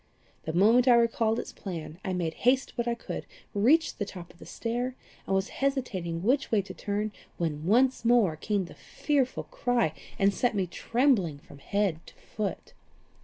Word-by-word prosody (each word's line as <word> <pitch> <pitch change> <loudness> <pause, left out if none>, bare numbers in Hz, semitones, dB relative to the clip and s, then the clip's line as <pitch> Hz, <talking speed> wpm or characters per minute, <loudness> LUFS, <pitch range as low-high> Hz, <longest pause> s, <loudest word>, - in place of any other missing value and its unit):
The 160 - -3
moment 225 +8 +5
I 245 - +8
recalled 230 -1 +2
its - - -4
plan, 170 -3 -7
I 190 - -2
made 175 -3 -1
what - - -20
haste 255 +2 +3
I 235 - +1
could, 235 - -6 0.3
reached 280 +11 +3
the - - +1
top 180 -3 -10
of 170 - -24
the - - -12
stair, 245 +2 -3 0.3
and 195 - +1
was 190 0 0
hesitating 190 -12 -1
which 265 +7 +1
way 210 -3 +3
to 185 -1 -9
turn, 210 +2 -2 0.3
when 160 -2 -2
once 250 +6 +3
more 230 -8 +4
came 200 +4 -1
the - - -11
fearful 275 -4 -1
cry, 240 -10 0 0.2
and 195 0 +3
set 235 +4 +1
me 195 -2 +1
trembling 210 - +1
from 140 - -15
head 200 0 0
to - - -14
foot. 210 -3 -5
210 Hz, 180 wpm, -28 LUFS, 180-245 Hz, 0.3 s, I